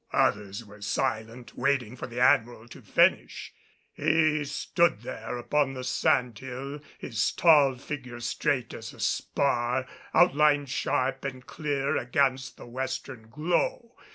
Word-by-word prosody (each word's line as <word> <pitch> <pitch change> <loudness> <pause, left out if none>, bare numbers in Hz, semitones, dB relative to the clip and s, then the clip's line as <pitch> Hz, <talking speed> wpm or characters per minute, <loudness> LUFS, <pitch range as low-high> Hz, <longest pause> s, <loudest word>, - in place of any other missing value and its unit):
Others 100 +2 0
were 105 0 -15
silent, 115 +2 -3
waiting 125 -3 0
for - - -6
the 120 0 -6
Admiral 120 -2 +3
to - - -12
finish. - - +1 0.4
He 155 -1 +2
stood 145 -3 +1
there 115 0 -5
upon 135 +2 0
the 130 - -5
sand 125 -2 +1
hill, 135 +3 -6 0.2
his 115 -4 -1
tall 145 -6 +5
figure 125 -2 -7
straight 120 +1 -1
as - - -8
a - - -17
spar, 125 -1 0 0.3
outlined 150 -4 +4
sharp 135 0 -1
and 130 -2 -6
clear 145 -3 -1
against 130 +1 0
the - - -11
western 125 -1 -5
glow. 175 - -1
130 Hz, 130 wpm, -27 LUFS, 120-140 Hz, 0.4 s, tall